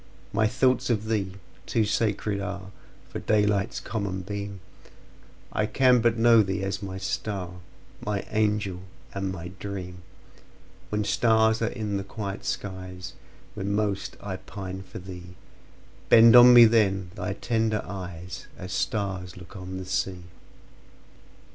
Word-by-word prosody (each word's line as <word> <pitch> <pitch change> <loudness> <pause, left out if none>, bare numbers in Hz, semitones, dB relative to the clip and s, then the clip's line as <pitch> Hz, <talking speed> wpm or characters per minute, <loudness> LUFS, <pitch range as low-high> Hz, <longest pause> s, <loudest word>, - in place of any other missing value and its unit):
My 110 - +3
thoughts 125 +2 +2
of 110 -2 0
thee 100 -4 -1 0.3
too 115 -2 +2
sacred 105 -1 0
areFor 95 0 -8
daylight's 105 -2 +2
common 100 -4 -3
beam:I 100 +1 -7
can 125 0 +4
but 120 0 +2
know 115 0 +6
thee 95 -1 -1
as 95 +1 -2
my 95 -1 -5
star, 95 -2 -4 0.4
My 105 -2 -2
angel 105 -4 0 0.3
and 95 -1 -2
my 90 -1 -6
dream; 90 -3 -6 0.9
When 105 0 0
stars 110 +1 +3
are 115 - +2
in 105 -4 -2
the 100 - -3
quiet 100 -1 -6
skies, 95 -2 -5 0.4
Then 100 +1 -2
most 105 -2 -1
I 95 -2 -5
pine 95 -1 -7
for 95 - -10
thee; 90 -1 -9 0.7
Bend 115 0 +8
on 125 0 +10
me 120 -1 +10
then 100 -5 +2
thy 105 - -3
tender 110 0 0
eyes, 90 -2 -7
As 90 0 -6
stars 95 -1 -2
look 90 -1 -12
on 95 -1 -6
the 95 - -6
sea! 90 0 -2
100 Hz, 135 wpm, -26 LUFS, 95-110 Hz, 0.9 s, on